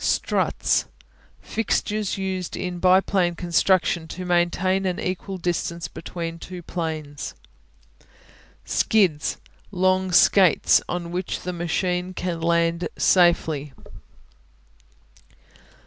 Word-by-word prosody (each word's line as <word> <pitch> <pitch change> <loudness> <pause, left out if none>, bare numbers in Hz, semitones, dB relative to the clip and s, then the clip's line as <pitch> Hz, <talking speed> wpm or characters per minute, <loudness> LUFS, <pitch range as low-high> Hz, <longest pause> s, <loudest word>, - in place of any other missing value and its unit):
Struts - - +1 0.6
Fixtures 215 -2 -1
used 190 -2 -3
in 180 -1 -4
biplane 185 -1 +3
construction 175 -1 +1
to 180 +3 -7
maintain 180 +2 +1
an 180 - -2
equal 185 +1 -4
distance 170 -1 -2
between 165 0 -6
two 180 0 -9
planes. 155 -4 -5 1.3
Skids 185 -9 +1 0.3
Long 185 -1 +1
skates 180 0 +5
on 170 -1 -3
which 180 +1 -3
the 180 - -4
machine 180 +1 -2
can 175 -2 -3
land 170 0 +1
in - - -2
safety. 160 -5 +3
180 Hz, 95 wpm, -23 LUFS, 170-185 Hz, 1.3 s, skates